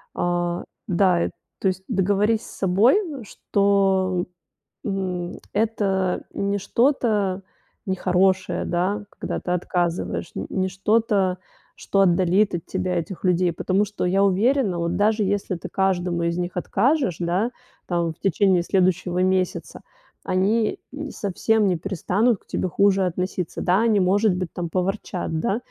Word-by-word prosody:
А, 175 0 -1 0.2
да, 180 -2 +3
и - - -2 0.3
то 190 - +2
есть, 185 0 -4
договорись 205 +1 +1
с - - -11
собой, 195 - +4 0.3
что, 195 -3 +1 0.6
м, 185 -3 -2 0.2
это 200 -4 0
не 200 0 -1
что-то 210 -3 +1 0.4
нехорошее, 185 0 +1
да, 190 +4 -1
когда - - -4
ты - - -5
отказываешь. 175 - -1
Н 95 - -3
не 190 0 0
что-то, 195 -1 +1 0.4
что 195 - 0
отдалит 185 +2 +3
от 170 - -3
тебя 180 -1 -2
этих 175 +2 -6
людей. 180 -1 +2
Потому 190 +4 +1
что 205 -3 -3
я 195 +2 +3
уверена, 205 0 +2
вот 170 +1 -1
даже 210 +2 +2
если 195 -2 -1
ты - - -8
каждому 180 -3 0
из 170 +1 -1
них 175 0 -2
откажешь, 240 - +1
да, 180 +7 0 0.4
там 170 -2 0
в - - -36
течение 190 -2 +2
следующего 180 -1 +1
месяца, 185 -1 -1 0.4
они 210 +4 +1 0.3
совсем 210 +2 0
не 180 - +1
перестанут 195 +5 0
к - - -33
тебе 185 - -2
хуже 195 +1 +3
относиться. 180 0 -3
Да, 185 +3 +3
они, 220 -3 +3
может 195 +2 +3
быть 180 -2 -4
там 170 -2 -4
поворчат, 185 -2 -2
да. 195 - 0
190 Hz, 140 wpm, -23 LUFS, 180-205 Hz, 0.6 s, собой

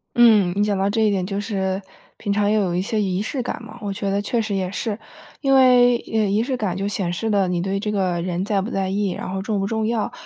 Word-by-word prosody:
嗯， 220 -6 +6
你 205 - +2
讲 205 -1 +1
到 195 +1 +1
这 220 +2 0
一 210 - +3
点， 190 -2 0
就 195 +1 -3
是 195 -2 -2 0.4
平 205 -2 -2
常 205 0 +2
也 215 - +2
有 190 -5 +1
一 180 - +1
些 220 +2 -1
仪 190 -1 -1
式 255 +5 -3
感 - - -4
嘛， 220 - -11
我 200 -2 -3
觉 195 +1 -3
得 200 +1 0
确 230 +3 0
实 215 -2 -2
也 185 -1 -2
是。 205 +1 -3 0.4
因 275 -2 +2
为， 250 -2 +6
呃， 220 -1 +2
仪 205 +2 +2
式 255 +2 -1
感 200 -6 -2
就 195 +2 -2
显 185 -3 -2
示 225 +6 -2
了 200 -3 +2
你 180 -1 -1
对 195 +2 -1
这 210 +1 -2
个 185 -4 0
人 180 0 -2
在 200 0 0
不 215 +6 -5
在 190 -1 -1
意， 200 0 0
然 - - -5
后 190 0 -3
重 210 0 -1
不 195 - -1
重 220 0 -1
要？ 225 -1 -1
200 Hz, 300 characters per minute, -22 LUFS, 190-220 Hz, 0.4 s, 嗯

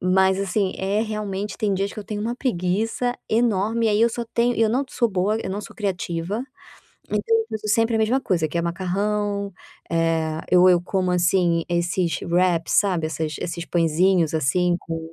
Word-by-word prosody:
Mas, 190 +1 +3
assim, 195 0 0
é, 195 +2 0
realmente, 210 -2 -4
tem 210 -2 0
dias 195 +1 -2
que - - -10
eu 210 - -6
tenho 210 0 -5
uma 230 +3 -2
preguiça 225 +1 -1
enorme 225 0 +1
e - - +3
aí 210 0 +2
eu 230 - +5
só 235 +1 -4
tenho 240 +1 +2
e - - -1
eu 225 - +4
não 255 +6 +1
sou 240 -3 0
boa, 200 +2 0
eu 190 - -4
não 200 +2 -3
sou - - -11
criativa, 190 0 -2 0.7
então - - 0 0.2
eu 450 0 -1
uso 215 -1 -4
sempre 225 0 +2
a - - +2
mesma 225 +5 +2
coisa 170 -9 0
que 170 - -3
é - - 0
macarrão, 200 +3 -1 0.4
eh, 165 -1 0
eu 180 0 +6
eu 180 -1 +5
como, 185 0 -1
assim, 175 -1 +2
esses 175 0 0
wraps, 175 -1 +1
sabe, 180 -6 +2
essas 155 0 -3
esses 170 -1 -4
pãezinhos 170 0 +2
assim 175 +4 +2
com 165 0 -6
190 Hz, 195 wpm, -23 LUFS, 170-215 Hz, 0.7 s, eu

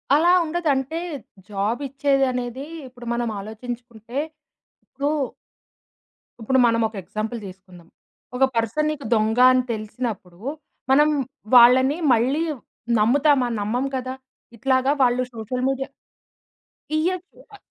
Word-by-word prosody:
అలా 340 +4 +5
ఉండదంటే 310 -2 -1 0.5
జాబిచ్చేదనేది 260 +3 -1 0.2
ఇప్పుడు 245 -1 -13
మనం 235 -1 -1
ఆలోచించుకుంటే 235 +2 -8 0.7
ఇప్పుడు... 280 +2 -3 1.3
ఇప్పుడు 260 +4 +2
మనం 230 0 +2
ఒక 220 - -13
ఎగ్జాంపుల్ 215 +5 -4
తీసుకుందాం. 185 -2 -14 0.5
ఒక 265 - +2
పర్సన్ 230 +7 +1
నీకు 290 -5 -6
దొంగ 220 +2 +1
అని 255 0 +3
తెలిసినప్పుడు, 215 -5 -5 0.5
మనం 295 +3 +6 0.5
వాళ్ళని 260 +4 +7 0.2
మళ్ళీ 260 +8 +2 0.6
నమ్ముతామా? 265 +3 +3
నమ్మము 245 +7 -1
కదా! 255 0 -4 0.4
ఇట్లాగా 260 +3 +2
వాళ్ళు 250 0 +3
సోషల్ 235 +3 -4
మీడియా 270 0 -2 1.1
ఇయ్యొచ్చు. 365 +6 -2
అ - - -11
250 Hz, 100 wpm, -23 LUFS, 225-275 Hz, 1.3 s, వాళ్ళని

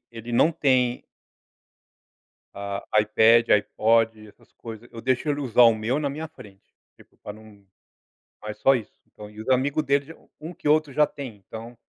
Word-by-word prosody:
ele 115 0 -9
não 135 +7 +4
tem 130 -6 +1 1.5
ah, 100 0 -5 0.2
iPad, 110 +2 +4
iPod, 115 +2 +1
essas - - -23
coisa, 115 0 -11
eu 115 - -8
deixo 130 +4 -1
ele 145 0 -1
usar 125 -3 +3
o 115 - +6
meu 110 +5 -2
na 145 -2 -1
minha 155 +3 -6
frente, 100 -10 -16 0.3
tipo - - -22
pra 105 - -8
não 105 -1 -17 0.8
mas 105 0 -7
só 135 - +4
isso, 115 -5 -4
então, 105 0 -13
e 105 +1 -12
os 110 - -9
amigo 130 +3 +1
dele 140 0 +1
já 165 - -11 0.3
um 160 +3 -7
que 150 - -5
outro 150 -2 +2
já 150 +2 +3
tem, 130 -8 -9
então. 115 +4 -11
115 Hz, 175 wpm, -24 LUFS, 110-140 Hz, 1.5 s, o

